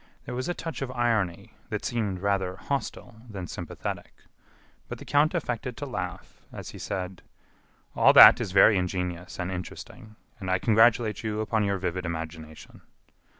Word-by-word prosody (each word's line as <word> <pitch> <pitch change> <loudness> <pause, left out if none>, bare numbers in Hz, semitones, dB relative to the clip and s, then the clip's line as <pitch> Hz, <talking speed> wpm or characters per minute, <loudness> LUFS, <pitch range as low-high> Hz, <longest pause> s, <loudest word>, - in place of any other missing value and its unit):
There - - -6
was 130 +7 -3
a 175 - -1
touch 165 -3 -6
of 135 - -3
irony, 115 -8 -1 0.2
that - - -4
seemed 105 -6 -2
rather 95 -2 0
hostile 125 -2 -5
than 95 -4 -6
sympathetic. - - -6 0.7
But - - -6
the - - -11
count 150 +4 +2
affected 125 -5 -3
to 145 - -5
laugh, 95 -9 -6
as - - -8
he - - -11
said: 90 -1 -5 0.7
"All - - +6
that - - +10
is 95 - -3
very 95 +1 +6
ingenious 90 -1 -4
and 90 +1 -2
interesting, 95 +4 -8 0.2
and 95 -3 -5
I 95 - +3
congratulate 110 +1 +3
you 110 -1 -3
upon 110 -1 0
your 100 -1 0
vivid 90 -1 -3
imagination." 80 -1 -8
100 Hz, 160 wpm, -27 LUFS, 90-120 Hz, 0.7 s, that